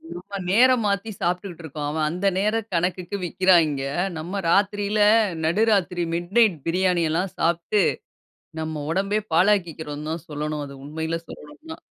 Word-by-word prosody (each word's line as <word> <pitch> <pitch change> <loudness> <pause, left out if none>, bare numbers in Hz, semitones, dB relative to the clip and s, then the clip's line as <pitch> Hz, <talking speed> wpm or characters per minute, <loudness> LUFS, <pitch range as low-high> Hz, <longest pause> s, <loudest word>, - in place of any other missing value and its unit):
நம்ம 190 +3 -7
நேரம் 245 +3 +5
மாத்தி 200 +2 -1
சாப்பிட்டுருக்கோம். 170 -5 -3
அவன் 155 0 0
அந்த 180 +4 -1
நேரம் 215 +2 0
கணக்குக்கு 180 +3 -1
விக்கிறாங்க. 170 -6 +3 0.4
நம்ம 185 +5 -4
ராத்திரியில 205 +2 +1 0.5
நடுராத்திரி 185 -1 +2
மிட்நைட் 185 +2 +2
பிரியாணி 180 0 +2
எல்லாம் 180 +4 -1
சாப்ட்டு 170 +5 +1 0.8
நம்ம 155 -2 -4
ஒடம்பையே 200 +3 0
பாழாக்கிகிறோம்னு 165 -5 +1
தான் 165 0 -5
சொல்லனும். 150 0 -3
அது 140 - -10
உண்மையிலயே 160 +2 -3
சொல்லனும்னா. 320 +2 -11
180 Hz, 120 wpm, -23 LUFS, 160-200 Hz, 0.8 s, நேரம்